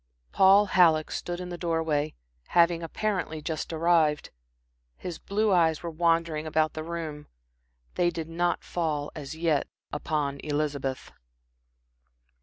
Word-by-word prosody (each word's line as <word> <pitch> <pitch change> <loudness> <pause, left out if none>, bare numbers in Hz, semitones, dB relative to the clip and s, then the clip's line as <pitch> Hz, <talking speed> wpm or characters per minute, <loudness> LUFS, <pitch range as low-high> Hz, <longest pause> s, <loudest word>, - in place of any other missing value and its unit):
Paul 195 +2 +6
Halleck 165 -5 +4
stood 175 0 -4
in 180 0 -6
the 175 -1 -6
door 165 -2 0
way, 150 -1 -1 0.4
having 170 0 +5
apparently 180 -1 -2
just 155 +2 -4
arrived. 160 -2 +2 0.7
His 175 -3 -6
blue 210 +1 0
eyes 165 -3 +3
were 170 - -4
wandering 165 -1 +1
about 155 0 +1
the 155 - -5
room. 160 -3 -5 0.7
They 175 - +2
did 165 -2 -5
not 175 +1 -1
fall, 155 -4 -2
as 150 0 -7
yet, 160 -3 +1 0.2
upon 145 -2 -2
Elizabeth. 145 -3 -2
165 Hz, 130 wpm, -27 LUFS, 155-175 Hz, 0.7 s, Paul